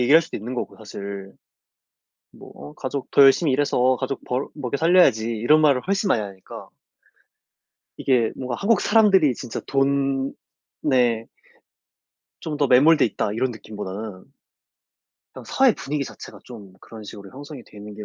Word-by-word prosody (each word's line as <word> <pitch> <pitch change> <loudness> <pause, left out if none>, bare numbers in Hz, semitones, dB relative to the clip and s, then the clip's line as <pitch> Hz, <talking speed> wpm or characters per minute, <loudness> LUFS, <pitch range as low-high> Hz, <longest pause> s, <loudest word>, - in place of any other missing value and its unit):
얘기할 145 +7 +5
수도 160 - -7
있는 120 +5 -6
거고 - - -5
사실 100 -2 -8 1.0
뭐 - - -14
어 75 +1 -11
가족 135 +1 -5
"더 140 - +5
열심히 135 +2 +5
일해서 130 -2 +2
가족 135 +1 -4
벌 125 +3 -2
먹여 140 -2 -3
살려야지." 160 -9 +4
이런 120 +8 +3
말을 140 -5 +3
훨씬 195 0 0
많이 115 - +2
하니까 95 -2 -10 1.3
이게 125 -4 +1
뭔가 125 -2 -4
'한국 215 +2 +2
사람들이 195 - +4
진짜 120 -1 -6
돈에' 135 -3 -1 1.2
'좀 155 -2 -4
더 145 -1 +1
매몰돼 145 +6 +5
있다.' 105 -2 -2
이런 130 +4 -1
느낌보다는 105 -1 -8 1.0
그냥 - - -11
사회 265 -3 +3
분위기 140 0 -3
자체가 - - -11
좀 105 -6 -12
그런 110 -2 -12
식으로 100 -1 -11
형성이 140 -1 -10
돼 - - -18
있는 105 0 -10
게 105 0 -8
130 Hz, 310 characters per minute, -22 LUFS, 110-145 Hz, 1.3 s, 얘기할